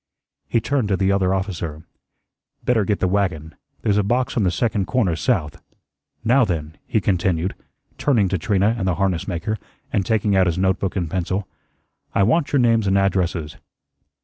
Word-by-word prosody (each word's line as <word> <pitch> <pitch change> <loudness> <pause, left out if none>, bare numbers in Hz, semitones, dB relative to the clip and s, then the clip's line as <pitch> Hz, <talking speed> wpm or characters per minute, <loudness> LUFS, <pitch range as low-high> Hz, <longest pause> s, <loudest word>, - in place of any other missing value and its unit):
He 115 - +2
turned 130 -1 0
to 100 -2 +1
the 95 +1 +2
other 95 -2 +2
officer. 85 -5 -3 0.8
"Better 115 -5 +2
get 105 - +1
the 95 - +3
wagon. 90 -5 -1 0.3
There's 105 0 +2
a - - +2
box 120 +5 0
on 115 - +2
the 95 - +3
second 100 +2 0
corner 110 -10 +1
south. 75 -2 -1 0.6
Now, 125 +4 +4
then," 80 -6 -2
he 110 - +1
continued, 90 -2 0 0.5
turning 115 -9 +3
to 95 -1 -1
Trina 100 +5 +2
and 95 - -1
the 90 - +1
harness 95 -2 0
maker 95 +4 -2 0.3
and 100 - +2
taking 105 -1 +1
out 95 -1 +4
his 85 - 0
note 95 0 +1
book 95 -1 -2
and 90 -4 -1
pencil, 95 +3 -2 0.7
"I 100 - +4
want 140 - +2
your 145 - +3
names 115 -4 +3
and 95 0 +3
addresses." 90 -5 0
95 Hz, 180 wpm, -21 LUFS, 90-105 Hz, 0.8 s, Now